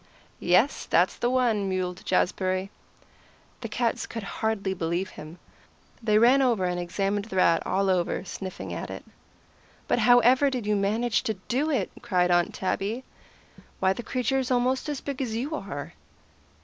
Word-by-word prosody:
"Yes, -, -, +2 dB
that's -, -, +3 dB
the 240 Hz, -, 0 dB
one," 235 Hz, -6 st, +1 dB
mewed 185 Hz, -1 st, -2 dB
Jazbury. 185 Hz, +1 st, 0 dB, 0.9 s
The 230 Hz, -, -6 dB
cats 230 Hz, +1 st, -1 dB
could 225 Hz, -2 st, -6 dB, 0.2 s
hardly 210 Hz, -3 st, 0 dB
believe 175 Hz, +1 st, -2 dB
him. 155 Hz, +3 st, -10 dB, 0.6 s
They 215 Hz, -2 st, +3 dB
ran 245 Hz, +5 st, +6 dB
over 235 Hz, -8 st, +2 dB
and 180 Hz, 0 st, -1 dB
examined 195 Hz, +3 st, -1 dB
the 225 Hz, -, -8 dB
rat 170 Hz, -3 st, +4 dB
all 195 Hz, +1 st, +1 dB
over, 185 Hz, 0 st, 0 dB
sniffing 190 Hz, 0 st, -6 dB
at -, -, -5 dB
it. -, -, -8 dB, 0.8 s
"But -, -, +2 dB
how 245 Hz, +2 st, +6 dB
ever 260 Hz, +4 st, +4 dB
did 250 Hz, -5 st, -3 dB
you 210 Hz, 0 st, +1 dB
manage 215 Hz, +4 st, +1 dB
to 220 Hz, -4 st, -2 dB
do 275 Hz, +6 st, 0 dB
it?" 255 Hz, -11 st, 0 dB
cried 180 Hz, -7 st, +1 dB
Aunt 175 Hz, 0 st, +3 dB
Tabby. 205 Hz, +6 st, -2 dB, 0.8 s
"Why, 190 Hz, 0 st, +3 dB
the 215 Hz, -, -6 dB
creature's 255 Hz, +1 st, -1 dB
almost 255 Hz, +3 st, +1 dB
as 290 Hz, -3 st, -3 dB
big 280 Hz, -1 st, -4 dB
as 230 Hz, -4 st, -2 dB
you 270 Hz, +7 st, -3 dB
are." 165 Hz, -, -6 dB
215 Hz, 160 wpm, -26 LUFS, 185-245 Hz, 0.9 s, ran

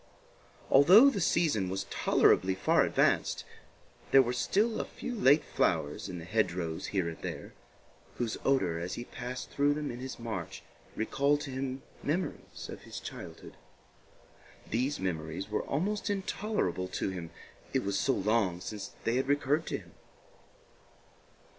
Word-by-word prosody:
Although 190 Hz, -, +8 dB
the 200 Hz, -, -2 dB
season 145 Hz, -, +2 dB
was 95 Hz, +1 st, -2 dB
tolerably 95 Hz, 0 st, +3 dB
far 95 Hz, -, +3 dB
advanced, -, -, +1 dB, 0.6 s
there 135 Hz, -1 st, +7 dB
were 120 Hz, 0 st, -2 dB
still 215 Hz, -, +1 dB
a -, -, -5 dB
few 250 Hz, -, -6 dB
late 155 Hz, -, +5 dB
flowers 75 Hz, +1 st, 0 dB
in 90 Hz, -, -5 dB
the 80 Hz, -, -8 dB
hedge 100 Hz, -2 st, +1 dB
rows 85 Hz, -3 st, -3 dB
here 95 Hz, -4 st, 0 dB
and 80 Hz, -, -6 dB
there, -, -, -6 dB, 0.6 s
whose 120 Hz, -3 st, -2 dB
odor 95 Hz, -12 st, +2 dB
as 85 Hz, +2 st, -4 dB
he 120 Hz, -, -6 dB
passed 125 Hz, +1 st, -6 dB
through 145 Hz, +1 st, +2 dB
them 150 Hz, -2 st, -3 dB
in 120 Hz, -, -7 dB
his 130 Hz, +1 st, -6 dB
march 115 Hz, -2 st, -5 dB, 0.3 s
recalled 140 Hz, +6 st, +1 dB
to 140 Hz, -, -5 dB
him 130 Hz, 0 st, -4 dB, 0.2 s
memories 170 Hz, +6 st, -3 dB
of -, -, -8 dB
his -, -, -8 dB
childhood. -, -, -9 dB, 1.1 s
These 130 Hz, +6 st, -1 dB
memories 85 Hz, +1 st, -3 dB
were 105 Hz, -, 0 dB
almost 200 Hz, +10 st, -1 dB
intolerable 200 Hz, -, -1 dB
to 95 Hz, -, -2 dB
him, 85 Hz, -3 st, -6 dB, 0.4 s
it -, -, +1 dB
was 100 Hz, 0 st, 0 dB
so 135 Hz, -, +2 dB
long 100 Hz, -5 st, +1 dB
since 105 Hz, +2 st, -6 dB
they 115 Hz, +2 st, +1 dB
had 130 Hz, -, 0 dB
recurred 145 Hz, +2 st, +1 dB
to -, -, -1 dB
him. -, -, -15 dB
125 Hz, 155 wpm, -31 LUFS, 95-145 Hz, 1.1 s, Although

